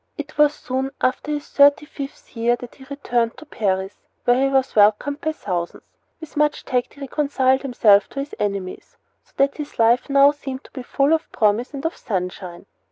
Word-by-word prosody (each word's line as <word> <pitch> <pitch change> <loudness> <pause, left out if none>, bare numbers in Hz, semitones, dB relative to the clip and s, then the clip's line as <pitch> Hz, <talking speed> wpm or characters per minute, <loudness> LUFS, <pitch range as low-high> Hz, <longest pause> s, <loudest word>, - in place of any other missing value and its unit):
It 300 0 -7
was 295 0 +4
soon 260 +1 -3
after 255 +3 -1
his 295 -1 -3
thirty 285 +1 +4
fifth 280 -2 -9
year 235 +1 +2
that 245 0 -11
he 265 - -15
returned 245 -5 -1
to 310 - -12
Paris, 190 -5 -2 0.3
where 245 +1 +3
he - - -2
was 265 -1 +1
welcomed 215 +8 +3
by 315 - 0
thousands. 180 - -4 0.4
With 320 -2 -11
much 300 0 +1
tact 250 -1 -1
he 285 - -15
reconciled 270 -2 +1
himself 220 -6 +4
to 275 - -6
his 280 +1 -5
enemies, 200 -3 -4 0.3
so - - -32
that 275 0 +2
his 295 -2 -7
life 235 +4 +3
now 280 +1 +6
seemed 270 -2 -7
to - - -18
be 260 - -7
full 275 +4 +1
of 320 - -1
promise 220 +6 +1
and 275 +3 -6
of 325 - -1
sunshine. 180 -3 -5
265 Hz, 195 wpm, -21 LUFS, 225-285 Hz, 0.4 s, now